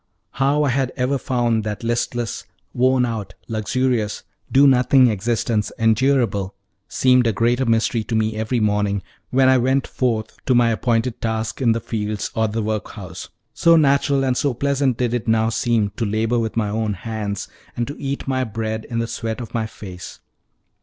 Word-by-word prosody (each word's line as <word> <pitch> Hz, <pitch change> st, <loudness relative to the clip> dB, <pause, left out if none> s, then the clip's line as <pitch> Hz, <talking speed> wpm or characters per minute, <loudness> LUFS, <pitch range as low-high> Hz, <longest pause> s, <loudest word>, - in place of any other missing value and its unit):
How 140 Hz, +2 st, +1 dB
I 145 Hz, -, +2 dB
had 130 Hz, 0 st, 0 dB
ever 130 Hz, +2 st, 0 dB
found 120 Hz, -3 st, 0 dB
that 105 Hz, +1 st, -4 dB
listless, 120 Hz, 0 st, -2 dB, 0.3 s
worn 130 Hz, 0 st, +3 dB
out, 110 Hz, -6 st, -5 dB
luxurious, 115 Hz, 0 st, -1 dB, 0.3 s
do 140 Hz, +2 st, +6 dB
nothing 130 Hz, 0 st, +5 dB
existence 110 Hz, +1 st, -1 dB
endurable, 110 Hz, -4 st, +1 dB, 0.3 s
seemed 125 Hz, -2 st, +3 dB
a -, -, +3 dB
greater 120 Hz, +4 st, +1 dB
mystery 115 Hz, 0 st, +1 dB, 0.3 s
every 110 Hz, +3 st, -1 dB
morning, 105 Hz, -2 st, 0 dB, 0.3 s
when 130 Hz, +1 st, +3 dB
I 130 Hz, 0 st, +5 dB
went 130 Hz, +2 st, +1 dB
forth 110 Hz, -4 st, -2 dB
to 130 Hz, -, +4 dB
my 120 Hz, -1 st, +4 dB
appointed 115 Hz, +1 st, 0 dB
task 110 Hz, +2 st, -2 dB
in 115 Hz, -3 st, +4 dB
the 115 Hz, -, -1 dB
fields 105 Hz, -2 st, -3 dB
or 110 Hz, 0 st, +1 dB
the 110 Hz, +1 st, -2 dB
workhouse, 110 Hz, -2 st, -5 dB, 0.2 s
so 170 Hz, 0 st, +5 dB
natural 140 Hz, -2 st, +3 dB
and 130 Hz, -1 st, +1 dB
so 135 Hz, -1 st, 0 dB
pleasant 140 Hz, -1 st, +1 dB
did 120 Hz, -2 st, 0 dB
it 120 Hz, -1 st, -2 dB
now 110 Hz, 0 st, +3 dB
seem 115 Hz, -3 st, 0 dB
to -, -, -1 dB
labor 110 Hz, +3 st, 0 dB
with 115 Hz, 0 st, -3 dB
my 105 Hz, -2 st, +1 dB
own 110 Hz, 0 st, -1 dB
hands, 100 Hz, 0 st, -4 dB, 0.3 s
and 120 Hz, -, 0 dB
to 145 Hz, -, -7 dB
eat 140 Hz, 0 st, -4 dB
my 130 Hz, -1 st, 0 dB
bread 110 Hz, -1 st, -4 dB
in 115 Hz, -, -5 dB
the 115 Hz, -, 0 dB
sweat 115 Hz, -1 st, -4 dB
of 120 Hz, -4 st, -8 dB
my 110 Hz, -2 st, -1 dB
face. 95 Hz, -4 st, -10 dB
115 Hz, 175 wpm, -21 LUFS, 110-130 Hz, 0.3 s, do